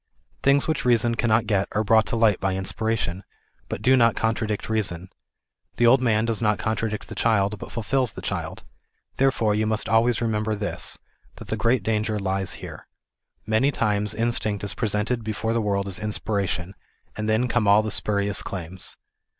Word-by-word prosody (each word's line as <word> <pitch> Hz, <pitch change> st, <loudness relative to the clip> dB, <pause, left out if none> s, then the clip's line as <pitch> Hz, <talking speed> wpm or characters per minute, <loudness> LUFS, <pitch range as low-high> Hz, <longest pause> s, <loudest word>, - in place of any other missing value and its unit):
Things 140 Hz, +1 st, +3 dB
which 160 Hz, -2 st, -1 dB
reason 120 Hz, -1 st, +3 dB
cannot 115 Hz, -1 st, +2 dB
o -, -, +4 dB
et 95 Hz, -, -1 dB
are 110 Hz, -, +1 dB
brought 110 Hz, 0 st, +4 dB
to -, -, -1 dB
light 110 Hz, -4 st, +3 dB
by 95 Hz, -1 st, -1 dB
inspiration, 95 Hz, -1 st, -2 dB, 0.5 s
but -, -, -5 dB
do 130 Hz, +1 st, +5 dB
not 115 Hz, -2 st, +4 dB
contradict 110 Hz, -2 st, -1 dB
reason. 95 Hz, -5 st, -2 dB, 0.7 s
The 120 Hz, -, +2 dB
old 125 Hz, +3 st, +6 dB
man 110 Hz, -3 st, +2 dB
does 115 Hz, -1 st, -1 dB
not 105 Hz, -2 st, +2 dB
contradict 110 Hz, -1 st, -2 dB
the -, -, -8 dB
child 105 Hz, -3 st, +1 dB
but -, -, -9 dB
fulfils 125 Hz, +1 st, 0 dB
the -, -, -8 dB
child. -, -, -4 dB, 0.5 s
Therefore 130 Hz, -5 st, +2 dB
you 110 Hz, +1 st, 0 dB
must 110 Hz, 0 st, 0 dB
always 115 Hz, +1 st, +3 dB
remember 110 Hz, -2 st, -1 dB
this 105 Hz, 0 st, -2 dB
ŌĆö -, -, -37 dB
that -, -, -11 dB
the -, -, 0 dB
great 115 Hz, -2 st, +1 dB
danger 110 Hz, 0 st, 0 dB
t 100 Hz, -, -5 dB
lies 95 Hz, 0 st, -1 dB
here: -, -, -10 dB, 0.6 s
ŌĆö -, -, -38 dB
Many 110 Hz, +6 st, +2 dB
times 105 Hz, -4 st, 0 dB
in 115 Hz, +1 st, +1 dB
stinct 105 Hz, -3 st, -1 dB
is 100 Hz, -, -1 dB
presented 110 Hz, +1 st, -1 dB
before 110 Hz, +1 st, -2 dB
'the 115 Hz, -, +1 dB
world 100 Hz, -2 st, 0 dB
as 95 Hz, -2 st, +1 dB
inspiration, 100 Hz, -3 st, -2 dB, 0.4 s
and 110 Hz, 0 st, -3 dB
then 110 Hz, +3 st, +2 dB
come 115 Hz, -3 st, +1 dB
all 105 Hz, +2 st, +6 dB
the 110 Hz, -, -3 dB
spurious 100 Hz, -1 st, 0 dB
claims. 95 Hz, -1 st, -4 dB
110 Hz, 190 wpm, -24 LUFS, 100-115 Hz, 0.7 s, old